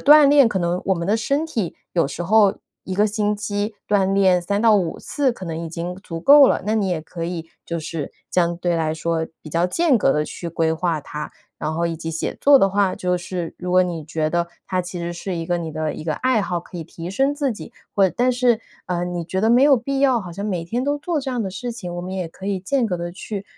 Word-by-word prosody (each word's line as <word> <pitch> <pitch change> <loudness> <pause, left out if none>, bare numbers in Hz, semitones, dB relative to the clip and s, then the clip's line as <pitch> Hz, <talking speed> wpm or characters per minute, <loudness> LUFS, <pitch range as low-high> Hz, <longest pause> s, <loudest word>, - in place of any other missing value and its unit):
锻 295 0 +8
炼 280 -4 +6
可 190 -5 -1
能 175 +1 0
我 190 - +3
们 170 0 -3
的 210 - +3
身 280 +7 0
体 225 - -3 0.2
有 170 -5 +2
时 175 - -5
候 205 +2 +4 0.3
一 190 - -4
个 205 +2 +3
星 210 0 0
期 205 +1 -2
锻 195 -2 +2
炼 190 -2 +4
3 200 +5 -1
到 220 -2 +6
5 175 -5 -1
次， 280 -4 0
可 190 - -9
能 165 -2 -4
已 165 - -5
经 170 +2 -5
足 170 -4 -7
够 280 - +8
了， - - +1
那 215 +2 +1
你 210 -3 +1
也 175 -3 -1
可 165 +1 -6
以， 165 -1 -5 0.2
就 170 -1 -3
是 155 -2 -5 0.2
相 170 -1 +1
对 175 -1 0
来 160 -1 0
说 160 0 -1 0.2
比 155 - -10
较 170 +3 +2
间 295 - +2
隔 - - +3
地 150 0 +1
去 170 - -6
规 165 -1 +1
划 160 -1 -1
它。 150 +1 -7 0.3
然 155 +1 -2
后 170 +1 0
以 165 - -3
及 165 0 -6
写 165 0 -3
作 285 0 +7
的 195 -6 +4
话 195 -1 +2
就 180 0 -1
是， 175 -2 -4
如 180 0 -3
果 185 0 +6
你 170 -3 -3
觉 155 0 -1
得 170 0 +1 0.2
它 185 - -1
其 180 0 -6
实 170 0 -3
是 180 +2 -4
一 165 -1 -3
个 175 +1 0
你 165 -2 -5
的 155 0 -2
一 - - -8
个 155 -2 -1
爱 255 -3 +1
好， 180 -3 -2
可 175 +1 -10
以 165 - -5
提 165 +1 -8
升 270 +8 +1
自 285 -3 0
己， 215 - -10 0.2
会 195 -2 +4
但 250 +1 +3
是 245 -2 +2 0.3
呃， 175 -1 -1
你 175 -1 -3
觉 190 +3 -2
得 220 +3 +3
没 240 +2 +5
有 285 -2 +6
必 270 +3 -2
要， 265 -3 +3
好 180 -4 -8
像 200 +4 -4
每 180 -5 -2
天 240 +9 -2
都 285 +1 +1
做 320 +1 -1
这 270 - -5
样 245 -2 -1
的 195 - -3
事 235 +6 -5
情， 180 -6 -7
我 - - -3
们 185 +1 -6
也 185 -3 -3
可 190 +4 -10
以 200 -2 -1
间 245 +6 +1
隔 185 -4 -1
地 175 0 -4
去 200 +3 -6
185 Hz, 285 characters per minute, -22 LUFS, 170-220 Hz, 0.3 s, 锻